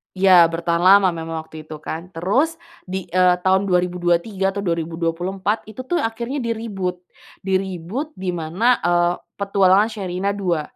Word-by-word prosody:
Ya, 185 Hz, -2 st, +7 dB
bertahan 170 Hz, +1 st, -1 dB
lama 195 Hz, 0 st, +7 dB
memang 165 Hz, -1 st, -4 dB
waktu 155 Hz, -1 st, -12 dB
itu, 155 Hz, -1 st, -9 dB
kan. 170 Hz, +4 st, -7 dB
Terus 215 Hz, -, +1 dB, 0.3 s
di, 190 Hz, 0 st, -5 dB
eee, 180 Hz, 0 st, +4 dB
tahun 190 Hz, +2 st, +2 dB
2023 180 Hz, +2 st, 0 dB
atau 200 Hz, -, -3 dB
2024 175 Hz, +4 st, -2 dB
itu, 220 Hz, +4 st, -8 dB
tuh, 345 Hz, +7 st, -1 dB
akhirnya 235 Hz, +1 st, -3 dB
di-reboot. 220 Hz, -7 st, -3 dB, 0.4 s
Di-reboot 190 Hz, -, -3 dB
dimana, 185 Hz, -, 0 dB
eee, 175 Hz, 0 st, +3 dB, 0.2 s
Petualangan 200 Hz, +1 st, +3 dB
Sherina 195 Hz, -2 st, -3 dB
Dua. 185 Hz, -6 st, -1 dB
185 Hz, 135 wpm, -21 LUFS, 175-200 Hz, 0.4 s, Ya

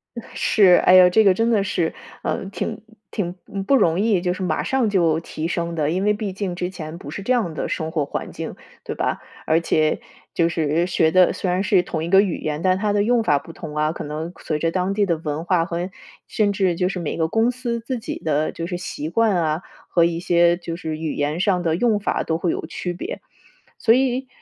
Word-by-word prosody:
哎， 235 Hz, -, -8 dB
是。 190 Hz, -4 st, +5 dB
哎 185 Hz, -, +7 dB
呦， 180 Hz, -1 st, +8 dB
这 220 Hz, +5 st, +4 dB
个 195 Hz, -2 st, +6 dB
真 225 Hz, +5 st, +1 dB
的 210 Hz, -4 st, +3 dB
是， 170 Hz, -4 st, -1 dB, 0.3 s
嗯， 195 Hz, -, -2 dB
挺 215 Hz, +1 st, -4 dB, 0.3 s
挺， 180 Hz, -4 st, -3 dB
嗯， 195 Hz, -1 st, -4 dB
不 275 Hz, -, +3 dB
容 175 Hz, -7 st, +3 dB
易 205 Hz, -4 st, +2 dB
就 180 Hz, -1 st, 0 dB
是 185 Hz, -, -7 dB
马 185 Hz, -, 0 dB
上 260 Hz, -4 st, +1 dB
就 170 Hz, -5 st, +2 dB
提 160 Hz, -1 st, -5 dB
升 170 Hz, -1 st, -2 dB
的， 155 Hz, -1 st, 0 dB
因 185 Hz, +3 st, 0 dB
为 210 Hz, -, +3 dB
毕 205 Hz, -2 st, -4 dB
竟 190 Hz, -2 st, -3 dB
之 180 Hz, 0 st, -3 dB
前 160 Hz, -2 st, -7 dB
不 145 Hz, -, -9 dB
是 155 Hz, -, -5 dB
这 250 Hz, -, -2 dB
样 215 Hz, -10 st, +1 dB
的 -, -, -3 dB
生 160 Hz, 0 st, -3 dB
活 155 Hz, -3 st, 0 dB
环 -, -, -5 dB
境， -, -, -6 dB, 0.3 s
对 -, -, -5 dB
吧？ -, -, -1 dB, 0.3 s
而 160 Hz, +1 st, +3 dB
且 155 Hz, -2 st, +1 dB, 0.3 s
就 170 Hz, -1 st, +2 dB
是 165 Hz, +1 st, 0 dB
学 160 Hz, -3 st, +2 dB
的 185 Hz, 0 st, +5 dB
虽 185 Hz, -, -2 dB
然 180 Hz, +1 st, +1 dB
是 190 Hz, -3 st, +3 dB
同 160 Hz, -3 st, -3 dB
一 170 Hz, -, -3 dB
个 195 Hz, +1 st, +7 dB
语 195 Hz, -5 st, -1 dB
言， 155 Hz, 0 st, -3 dB
但 185 Hz, 0 st, +3 dB
它 210 Hz, 0 st, 0 dB
的 205 Hz, 0 st, +2 dB
用 235 Hz, +1 st, +2 dB
法 145 Hz, -8 st, +3 dB
不 165 Hz, -, -9 dB
同 150 Hz, -2 st, -8 dB
啊， 155 Hz, 0 st, +2 dB
可 -, -, -6 dB
能 155 Hz, +3 st, -5 dB
随 155 Hz, -, -1 dB
着 165 Hz, +2 st, 0 dB
当 185 Hz, +2 st, 0 dB
地 205 Hz, -1 st, +3 dB
的 170 Hz, -3 st, +1 dB
文 155 Hz, 0 st, -4 dB
化 175 Hz, -2 st, +2 dB
和 175 Hz, +1 st, -4 dB, 0.4 s
甚 210 Hz, -2 st, +1 dB
至 190 Hz, -3 st, +1 dB
就 180 Hz, +1 st, 0 dB
是 190 Hz, -, -4 dB
每 160 Hz, -, -3 dB
个 160 Hz, -1 st, 0 dB
公 225 Hz, +7 st, +2 dB
司 240 Hz, -2 st, -3 dB
自 235 Hz, +1 st, -4 dB
己 -, -, -5 dB
的 155 Hz, -1 st, 0 dB
就 165 Hz, -, -5 dB
是 175 Hz, 0 st, -3 dB
习 155 Hz, -3 st, -5 dB
惯 225 Hz, +1 st, +2 dB
啊， 160 Hz, 0 st, 0 dB, 0.3 s
和 170 Hz, -2 st, +4 dB
一 170 Hz, 0 st, -1 dB
些 175 Hz, -1 st, +3 dB
就 170 Hz, -2 st, -6 dB
是 160 Hz, -2 st, -4 dB
语 160 Hz, -1 st, -3 dB
言 145 Hz, +3 st, -1 dB
上 185 Hz, -2 st, +2 dB
的 165 Hz, -2 st, +1 dB
用 215 Hz, +2 st, +2 dB
法 205 Hz, -, -1 dB
都 160 Hz, 0 st, -1 dB
会 175 Hz, -, 0 dB
有 -, -, -3 dB
区 180 Hz, -1 st, -4 dB
别。 175 Hz, -, -6 dB, 0.6 s
所 225 Hz, -, +4 dB
以， 260 Hz, 0 st, +1 dB
180 Hz, 265 characters per minute, -22 LUFS, 160-205 Hz, 0.6 s, 呦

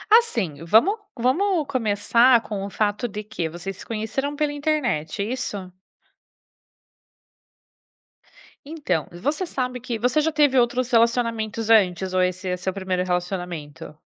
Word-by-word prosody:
assim, 215 Hz, -, +3 dB
vamos 235 Hz, -, +4 dB, 0.2 s
vamos 310 Hz, -, +1 dB
começar 235 Hz, 0 st, +3 dB
com 200 Hz, -2 st, -5 dB
o 200 Hz, -, -6 dB
fato 210 Hz, +4 st, 0 dB
de 210 Hz, 0 st, -6 dB
que 175 Hz, -6 st, -4 dB
vocês 175 Hz, +4 st, -7 dB
se -, -, -10 dB
conheceram 230 Hz, +6 st, -3 dB
pela 295 Hz, 0 st, 0 dB
internet, 245 Hz, -, -1 dB
é -, -, -2 dB
isso? 205 Hz, -7 st, -4 dB, 3.0 s
Então, 300 Hz, -, -2 dB
você 290 Hz, -, -2 dB
sabe 250 Hz, -5 st, -3 dB
que 235 Hz, -2 st, -4 dB
você 250 Hz, +6 st, +2 dB
já 320 Hz, +1 st, +1 dB
teve 290 Hz, -3 st, +3 dB
outros 245 Hz, +1 st, +2 dB
relacionamentos 230 Hz, -2 st, +1 dB
antes 185 Hz, -4 st, +3 dB
ou 185 Hz, -, +3 dB
esse 185 Hz, +1 st, -2 dB
é 180 Hz, 0 st, -1 dB
seu 185 Hz, +1 st, -3 dB
primeiro 190 Hz, -2 st, -2 dB
relacionamento? 175 Hz, -6 st, -4 dB
220 Hz, 135 wpm, -23 LUFS, 185-260 Hz, 3.0 s, vamos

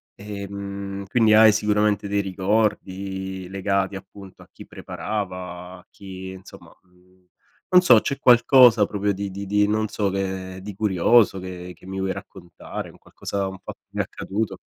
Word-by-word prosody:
ehm, 100 Hz, -1 st, -6 dB
quindi 110 Hz, -1 st, +3 dB
hai 110 Hz, 0 st, +8 dB
sicuramente 105 Hz, -1 st, +1 dB
dei 100 Hz, 0 st, 0 dB
ricordi 95 Hz, -1 st, -2 dB
legati, 100 Hz, 0 st, -1 dB
appunto, 95 Hz, 0 st, -12 dB
a -, -, -22 dB
chi -, -, -13 dB
preparava, 90 Hz, -3 st, -6 dB
a 90 Hz, -, -22 dB
chi, 95 Hz, -1 st, -9 dB
insomma, 95 Hz, 0 st, -13 dB
mhmm, 90 Hz, 0 st, -28 dB, 0.4 s
non 180 Hz, 0 st, +7 dB
so, 125 Hz, -11 st, +7 dB
c'è 140 Hz, -, -3 dB
qualcosa 120 Hz, -3 st, +6 dB
proprio 100 Hz, 0 st, -1 dB
di 100 Hz, 0 st, -4 dB
di 100 Hz, +1 st, -6 dB
di 105 Hz, +1 st, +2 dB
non 110 Hz, +1 st, 0 dB
so 100 Hz, -1 st, -1 dB
che, 95 Hz, -1 st, -4 dB
di 105 Hz, +2 st, -7 dB
curioso 105 Hz, +2 st, +3 dB
che 90 Hz, -1 st, -8 dB
che -, -, -19 dB
mi 95 Hz, 0 st, -6 dB
vuoi 95 Hz, 0 st, -1 dB
raccontare, 85 Hz, -3 st, -9 dB
un -, -, -19 dB
qualcosa 100 Hz, -1 st, -4 dB
un 95 Hz, 0 st, -7 dB
fatto -, -, -10 dB
che -, -, -68 dB
ti -, -, -10 dB
è -, -, +2 dB
accaduto 105 Hz, +3 st, -4 dB
100 Hz, 165 wpm, -23 LUFS, 95-105 Hz, 0.4 s, hai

